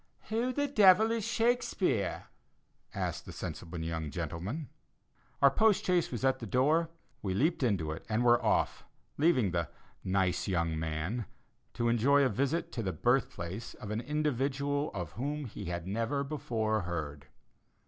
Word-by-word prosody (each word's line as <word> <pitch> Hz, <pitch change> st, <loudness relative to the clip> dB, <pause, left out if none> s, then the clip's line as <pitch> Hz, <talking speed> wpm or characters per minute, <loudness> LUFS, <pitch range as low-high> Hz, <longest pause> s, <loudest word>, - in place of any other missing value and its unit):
"Who 230 Hz, +4 st, 0 dB
the 285 Hz, +3 st, 0 dB
devil 215 Hz, -4 st, +6 dB
is 230 Hz, -2 st, -1 dB
Shakespeare?" 225 Hz, -, +1 dB, 0.7 s
asked -, -, -3 dB
the -, -, -6 dB
sensible 85 Hz, +1 st, -6 dB
young 80 Hz, -1 st, -3 dB
gentleman. 105 Hz, -, -4 dB, 0.7 s
Our 140 Hz, -, +8 dB
post 215 Hz, +7 st, +3 dB
chaise 180 Hz, -2 st, +2 dB
was 125 Hz, +1 st, -2 dB
at 130 Hz, 0 st, +2 dB
the 115 Hz, -, -6 dB
door; 150 Hz, -, +2 dB, 0.3 s
we 95 Hz, -2 st, -2 dB
leaped 155 Hz, -, +1 dB
into 95 Hz, -, +1 dB
it, 80 Hz, -, -6 dB
and 110 Hz, +2 st, +1 dB
were 120 Hz, 0 st, +5 dB
off, -, -, +1 dB, 0.4 s
leaving 145 Hz, -, +3 dB
the 85 Hz, -2 st, -1 dB, 0.3 s
"nice 95 Hz, -1 st, +1 dB
young 85 Hz, -4 st, 0 dB
man" 80 Hz, +8 st, -3 dB, 0.5 s
to 120 Hz, -, 0 dB
enjoy 130 Hz, +5 st, +4 dB
a 130 Hz, -, +3 dB
visit 140 Hz, +7 st, -1 dB
to 120 Hz, -, -3 dB
the 95 Hz, -4 st, -1 dB
birth 125 Hz, -, +2 dB
place 90 Hz, +7 st, -6 dB
of 105 Hz, -, -8 dB
an 110 Hz, +2 st, -1 dB
individual 145 Hz, 0 st, 0 dB
of 90 Hz, -5 st, -4 dB
whom 145 Hz, +4 st, -3 dB
he 115 Hz, -, -7 dB
had 85 Hz, 0 st, -4 dB
never 115 Hz, +8 st, -1 dB
before 115 Hz, -7 st, -1 dB
heard. 80 Hz, -5 st, -5 dB
120 Hz, 160 wpm, -31 LUFS, 95-150 Hz, 0.7 s, Our